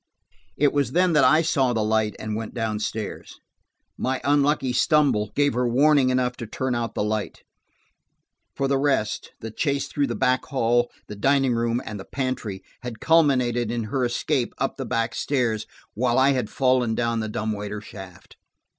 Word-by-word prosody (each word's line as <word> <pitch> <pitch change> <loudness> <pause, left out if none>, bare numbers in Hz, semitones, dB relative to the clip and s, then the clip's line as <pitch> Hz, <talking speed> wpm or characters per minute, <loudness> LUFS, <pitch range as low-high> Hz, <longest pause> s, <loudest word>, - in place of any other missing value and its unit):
It 145 -1 +3
was 145 -1 0
then 180 0 +3
that 150 - +5
I 155 +6 +5
saw 135 -6 +1
the 110 -2 0
light 110 0 +1
and 110 0 -4
went 110 +2 -5
downstairs. 110 -2 -4 0.6
My 130 +1 -1
unlucky 140 -1 +2
stumble 135 - +2
gave 145 -2 +2
her 125 +1 0
warning 140 +2 +4
enough 125 -1 0
to 115 - -6
turn 130 +3 -2
out 115 -2 -3
the - - 0
light. 105 0 -3 1.1
For 135 - 0
the 135 0 +1
rest, 135 -7 0
the 115 - -6
chase 140 +4 -1
through 145 -1 -1
the 120 - -3
back 130 +4 +1
hall, 120 -2 +1 0.2
the 105 - -8
dining 135 +3 +2
room 115 +1 0
and 105 -2 -6
the 95 - -8
pantry, 130 -8 -4 0.2
had 120 -3 -7
culminated 125 -8 +3
in 120 0 -2
her 135 -2 +1
escape 120 +2 -1
up 135 - -2
the 135 - -4
back 115 0 -1
stairs, 120 -6 -1 0.3
while 120 +2 +1
I 135 +1 +5
had 125 -6 -1
fallen 125 -3 +1
down 115 -1 0
the 110 -1 -3
dumbwaiter 105 -1 -3
shaft. 95 -4 -12
125 Hz, 175 wpm, -24 LUFS, 110-135 Hz, 1.1 s, that